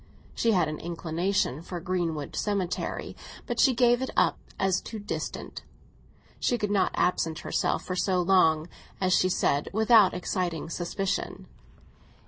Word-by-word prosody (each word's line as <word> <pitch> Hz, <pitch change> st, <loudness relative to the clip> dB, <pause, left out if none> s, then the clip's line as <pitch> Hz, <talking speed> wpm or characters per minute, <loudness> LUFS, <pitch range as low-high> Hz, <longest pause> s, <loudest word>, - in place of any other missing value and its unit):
She 230 Hz, -1 st, +2 dB
had 175 Hz, -5 st, +3 dB
an 155 Hz, 0 st, -5 dB
inclination 170 Hz, -2 st, -1 dB
for 175 Hz, +1 st, -6 dB
Greenwood 165 Hz, -5 st, -2 dB
Cemetery, 200 Hz, -4 st, -2 dB, 0.3 s
but -, -, -3 dB
she 265 Hz, -4 st, +5 dB
gave 245 Hz, 0 st, +4 dB
it 260 Hz, -, -2 dB
up -, -, +3 dB, 0.2 s
as 190 Hz, -1 st, +1 dB
too 225 Hz, -, -7 dB
distant; 205 Hz, -1 st, -5 dB, 0.8 s
she 245 Hz, -, +1 dB
could 210 Hz, -3 st, -2 dB
not 195 Hz, -3 st, +1 dB
absent 165 Hz, -2 st, 0 dB
herself -, -, -1 dB
for 185 Hz, -, -3 dB
so 185 Hz, 0 st, +1 dB
long, 170 Hz, -4 st, +3 dB, 0.3 s
as 185 Hz, -1 st, +2 dB
she 185 Hz, -, +3 dB
said, 145 Hz, -5 st, +1 dB
without 220 Hz, -2 st, +5 dB
exciting 175 Hz, -3 st, -2 dB
suspicion. 180 Hz, +3 st, -3 dB
185 Hz, 140 wpm, -27 LUFS, 170-205 Hz, 0.8 s, she